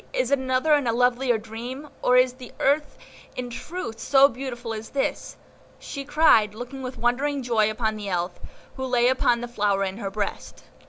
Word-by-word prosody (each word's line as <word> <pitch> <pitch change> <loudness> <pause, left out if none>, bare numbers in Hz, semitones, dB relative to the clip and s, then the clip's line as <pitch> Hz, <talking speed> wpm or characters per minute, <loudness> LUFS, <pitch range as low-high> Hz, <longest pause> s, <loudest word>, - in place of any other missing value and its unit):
is - - 0
it 280 - +3
another 260 +4 +2
and 290 -4 +2
a - - +3
lovelier 245 +1 +2
dream, 235 +6 -7
or 250 - +4
is 255 0 +4
the 255 -1 -11
earth 290 +2 +1 0.4
in 250 -1 -5
truth 235 -3 -6
so 275 0 +6
beautiful 245 -3 -6
as 220 0 -7
this?" 275 - -2 0.4
she 280 - -7
cried, 275 -8 +4
looking 245 +4 -7
with 255 0 -6
wondering 270 +3 0
joy 225 -3 +2
upon 220 0 -1
the 205 -2 -5
Elf, 175 -1 -2 0.4
who 265 - -3
lay 245 -1 +3
upon 245 -2 +2
the 240 - -4
flower 205 -4 0
in 190 0 -3
her 200 -3 -3
breast. 205 0 -5
245 Hz, 190 wpm, -25 LUFS, 220-270 Hz, 0.4 s, so